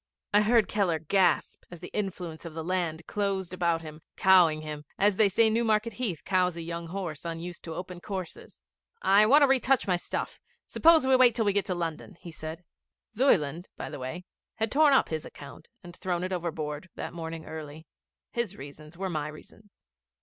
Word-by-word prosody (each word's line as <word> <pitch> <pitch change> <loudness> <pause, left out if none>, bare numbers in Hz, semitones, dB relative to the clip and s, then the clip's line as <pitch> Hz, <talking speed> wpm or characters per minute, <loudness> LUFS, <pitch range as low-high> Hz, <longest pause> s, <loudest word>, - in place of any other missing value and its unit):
I 205 - +6
heard 220 -1 +4
Keller 190 -6 +1
gasp 185 +5 +1
as 175 - -10
the 180 - -9
influence 180 -6 -4
of 165 -2 -8
the 160 - -4
land 175 -2 -2
closed 195 -3 -2
about 170 -2 0
him, 155 0 -10 0.2
cowing 175 -5 +5
him 150 -1 -6
as 200 -1 +3
they 215 -2 +5
say 220 +4 +4
Newmarket 220 0 +1
Heath 205 -8 -3
cows 180 -2 +1
a 165 - -5
young 170 0 -5
horse 170 -4 -5
unused 170 +1 -6
to 165 -1 -6
open 180 0 -7
courses. 185 -4 -7 0.4
'I 205 +2 +6
want 285 +5 +6
to - - +6
retouch 265 0 +3
my 180 -2 +2
stuff. - - -4 0.3
Suppose 325 -3 +5
we 260 0 +5
wait 250 -3 +6
till 225 - +1
we 205 - +2
get 200 0 +1
to 185 - -2
London?' 170 +2 -5
he 170 - -10
said. 160 +2 -7 0.5
Zuyland, 175 - +2
by - - -6
the - - -7
way, 145 +8 -6 0.3
had 220 -1 -1
torn 300 0 +5
up - - +3
his 160 -1 -3
account 145 +2 -12 0.2
and 175 0 -11
thrown 180 -1 -2
it 185 +1 -2
overboard 160 -1 -4
that - - -6
morning 165 -1 -6
early. 155 0 -8 0.5
His 235 -5 -2
reasons 150 +4 -11
were 190 +1 -2
my 155 -4 -2
reasons. 195 +7 -14
180 Hz, 195 wpm, -28 LUFS, 160-205 Hz, 0.5 s, I